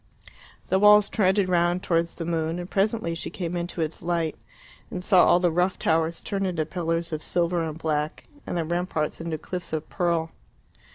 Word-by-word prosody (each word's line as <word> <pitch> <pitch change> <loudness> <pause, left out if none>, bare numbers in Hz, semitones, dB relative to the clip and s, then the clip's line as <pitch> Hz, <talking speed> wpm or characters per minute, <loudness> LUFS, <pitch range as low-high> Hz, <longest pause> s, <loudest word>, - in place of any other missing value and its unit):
The 190 - +3
walls 210 0 +7
trended 190 -1 +2
round 175 0 +1
towards 170 -1 0
the 165 - -5
moon; 165 0 -1
and 175 0 -5
presently 200 -2 0
she 165 - -5
came 175 0 -4
into 175 0 -3
its 160 0 -3
light, 170 -2 -1 0.5
and 180 - -5
saw 185 -2 +6
all 175 - +5
the 175 -1 +2
rough 180 +3 +1
towers 165 +1 0
turn 195 -1 -2
into 175 -5 -1
pillars 165 0 -2
of 155 - -3
silver 175 +1 0
and 160 -1 -4
black, 155 -1 -2 0.2
and - - -2
the 165 - -1
ramparts 170 -2 -2
into 165 -1 -3
cliffs 175 +1 -6
of 155 0 -2
pearl. 170 -3 0
170 Hz, 185 wpm, -25 LUFS, 165-180 Hz, 0.5 s, walls